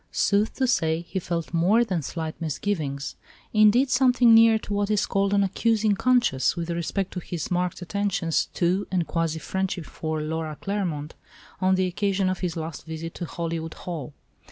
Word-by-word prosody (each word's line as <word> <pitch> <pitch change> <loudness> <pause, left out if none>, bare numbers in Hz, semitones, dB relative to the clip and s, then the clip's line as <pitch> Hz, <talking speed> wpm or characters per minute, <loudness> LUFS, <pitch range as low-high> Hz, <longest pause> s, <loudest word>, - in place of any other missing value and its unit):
Sooth 205 +2 +1
to 265 - +1
say, 165 -10 +1
he 180 +3 -4
felt 170 -1 -4
more 190 +8 +4
than 185 -6 -1
slight 160 +2 -4
misgivings; 155 -3 -2 0.4
indeed, 220 +5 +5
something 250 -2 +5
near 225 0 +7
to 210 - -6
what 205 0 0
is 210 -1 +2
called 195 0 0
an 200 0 +3
accusing 215 +2 +2
conscience, 240 - +2
with 170 0 -3
respect 170 +3 -2
to 180 - -3
his 170 -2 -5
marked 180 0 -1
attentions 180 -3 0
to 185 +3 +1
and 180 -3 0
quasi 165 +1 -1
friendship 185 +1 -3
for 155 +1 -4
Laura 155 0 -3
Claremont 175 -7 -3 0.5
on 190 0 +3
the 185 0 +1
occasion 190 +1 0
of 185 - -4
his 175 -3 -3
last 160 -1 -5
visit 160 +1 -6
to 175 - -5
Hollywood 165 -1 -4
Hall. 155 -5 -6
180 Hz, 175 wpm, -25 LUFS, 165-205 Hz, 0.5 s, near